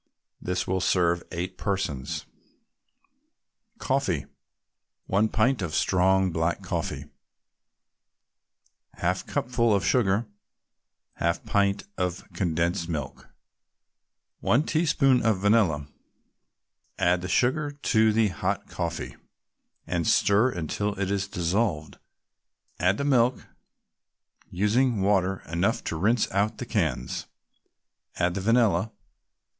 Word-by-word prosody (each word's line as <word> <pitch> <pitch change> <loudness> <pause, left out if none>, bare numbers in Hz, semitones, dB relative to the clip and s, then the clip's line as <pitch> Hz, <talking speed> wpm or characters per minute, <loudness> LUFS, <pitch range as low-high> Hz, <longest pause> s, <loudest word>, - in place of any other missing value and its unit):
This 90 0 -2
will 95 0 -1
serve 85 -2 +2
eight 90 +2 -5
persons. 95 -10 -2 1.5
COFFEE 130 - -1 0.8
1 100 +3 +2
pint 115 +2 +1
of 85 -4 -3
strong 95 0 +2
black 80 +1 -1
coffee - - -3 1.9
1/2 - - -1
cupful 120 -3 +1
of 100 - 0
sugar 110 -2 +2 0.9
1/2 85 +1 0
pint 100 0 +1
can - - -24 0.2
of 90 0 -5
condensed 85 0 -1
milk 75 -5 -5 1.1
1 130 +6 +2
teaspoonful 135 -7 +2
of 110 - +2
vanilla 95 -7 +2 1.1
Add 90 0 +2
the 90 - -4
sugar 130 +8 +1
to 110 -6 +2
the 110 -1 +2
hot 95 - -3
coffee, - - -4 0.7
and 85 -2 -1
stir 105 +5 +4
until 100 +1 -3
it 100 -1 -1
is 100 -1 -1
dissolved; 90 -3 -1 0.8
add 90 +4 +2
the - - -2
milk, 125 -3 +2 1.0
using 105 +4 +1
water 95 -1 +1
enough 90 +8 0
to - - -3
rinse 105 +8 +2
out 100 +3 0
the - - -5
cans; 60 - -2 0.9
add 85 0 +1
the 95 - -3
vanilla. 110 -2 +2
100 Hz, 105 wpm, -26 LUFS, 90-115 Hz, 1.9 s, stir